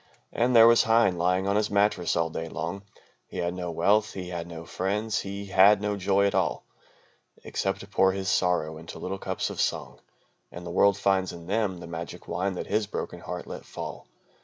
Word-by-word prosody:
And 120 +1 +1
there 115 -1 +9
was 115 0 +7
Heine 115 -6 +3
lying 90 +2 +1
on 100 - +1
his 105 0 +1
mattress 100 -3 +2
all 80 -1 0
day 80 0 -5
long, 85 +5 -4 0.5
He - - -9
had 85 0 -1
no 90 -1 -4
wealth, 100 +6 +2
he 90 -2 -6
had 85 -1 -5
no 85 -1 -8
friends, 105 +5 -1
he 100 +1 -5
had 100 +1 +6
no 105 0 -1
joy 100 +1 +2
at 100 - +1
all, - - 0 0.8
Except 95 0 -2
to 100 - -10
pour 95 -2 +3
his 95 0 -4
sorrow 85 -5 +1
into 80 - -9
little 95 +1 -5
cups - - -3
of - - -3
song, - - -2 0.5
And 85 0 -9
the 85 - -5
world 100 +2 +4
finds 95 -2 +1
in 85 -1 -10
them 100 0 0
the 85 - -8
magic 85 0 -7
wine 100 - -1
that - - -4
his 105 +1 0
broken - - -5
heart - - -6
let - - -8
fall. - - -8
95 Hz, 210 wpm, -27 LUFS, 85-100 Hz, 0.8 s, there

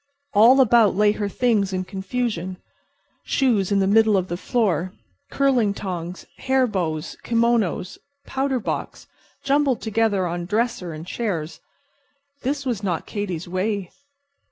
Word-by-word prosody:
All 235 +6 +7
about 230 -5 +5
lay 210 +1 +4
her 205 -1 -3
things 210 -3 +1
in 185 0 -2
confusion. 190 -1 -3 0.7
Shoes 220 -8 +1
in 200 - +3
the 195 - +3
middle 215 +1 +4
of 185 -1 -2
the 175 - -2
floor, 185 -3 0 0.4
curling 250 -7 +2
tongs, 180 -2 -5
hair 265 0 +2
bows, 170 -9 -3
kimonos, 230 -6 0 0.3
powder 265 -1 -1
box, - - -4 0.4
jumbled 275 -2 +2
together 220 -3 +1
on 175 0 -3
dresser 215 -3 -1
and 155 +1 -8
chairs—this 275 - -6
was 240 -6 -1
not 180 -5 -2
Katy's 185 -5 -4
way. 190 +1 -2
205 Hz, 130 wpm, -23 LUFS, 185-240 Hz, 0.7 s, All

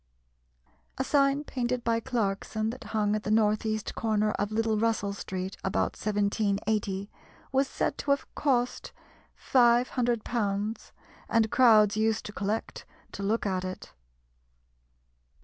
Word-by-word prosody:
A 265 - 0
sign 275 +1 +2
painted 250 -3 -2
by 230 0 +1
Clarkson, 220 -2 -2
that 255 +2 -10
hung 210 -1 0
at 215 - -2
the 210 - -5
north 215 0 +2
east 215 -1 -2
corner 215 -1 +1
of 205 0 -2
Little 220 0 +1
Russell 220 -3 0
Street 190 -1 -5
about 190 - 0
1780, 205 -1 -1 0.4
was 270 +1 +2
said - - -2
to 285 - -5
have 280 0 +2
cost 250 -4 0 0.4
£500, 235 -4 +1 0.4
and 225 -2 +2
crowds 215 -5 +5
used 220 0 +1
to 210 - -7
collect 210 +2 -3 0.3
to - - -7
look 210 +3 0
at 185 -2 -1
it. 185 0 -7
220 Hz, 130 wpm, -28 LUFS, 205-240 Hz, 0.4 s, crowds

